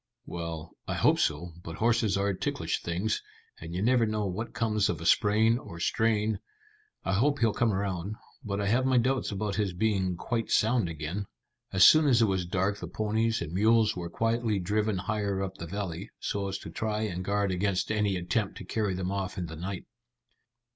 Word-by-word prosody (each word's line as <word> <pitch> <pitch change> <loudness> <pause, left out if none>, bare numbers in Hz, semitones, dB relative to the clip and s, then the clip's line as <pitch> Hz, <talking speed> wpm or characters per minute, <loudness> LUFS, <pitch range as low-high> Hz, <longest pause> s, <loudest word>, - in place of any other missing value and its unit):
"Well, 85 -1 -5 0.2
I - - -1
hope - - +3
so, 80 +3 0
but 80 - -6
horses 110 -1 +2
are 100 0 +1
ticklish - - -2
things, 90 +6 -1 0.4
and 85 +1 -7
you 95 - -1
never 120 -1 +4
know 105 -1 -1
what 110 +5 -3
comes 110 -3 +1
of 85 - -1
a 85 - -7
sprain 110 +6 +4
or 85 -9 -10
strain. 110 +1 +1 0.7
I 95 - +1
hope 140 +8 +2
he'll 115 -5 +2
come 120 -2 +2
round, 95 0 -2 0.3
but 100 -3 -2
I 100 - 0
have 120 +6 +2
my 130 -1 +3
doubts 130 0 +1
about 100 0 -2
his 100 -4 0
being 95 -2 0
quite 115 +4 -2
sound 110 -4 +3
again." 80 +6 -4 0.4
As 95 -2 +7
soon 155 -1 +7
as 125 -4 +5
it 115 - +5
was 95 -3 0
dark 95 +3 0
the - - -5
ponies 110 0 0
and 80 0 -7
mules 110 +2 +4
were 85 -1 -4
quietly 115 +2 0
driven 105 +2 0
higher 100 +1 -1
up 95 0 -5
the 85 - -5
valley, 95 +1 -4
so 100 -1 -2
as 95 0 -3
to 80 - -9
try 110 +4 -2
and 95 -4 -2
guard 100 0 0
against 95 +2 0
any 105 -2 +1
attempt 95 +4 -1
to - - -8
carry 105 -1 -1
them 90 0 -2
off 100 0 -3
in 90 - -2
the 80 -1 -7
night. 90 +3 -5
100 Hz, 200 wpm, -29 LUFS, 90-110 Hz, 0.7 s, As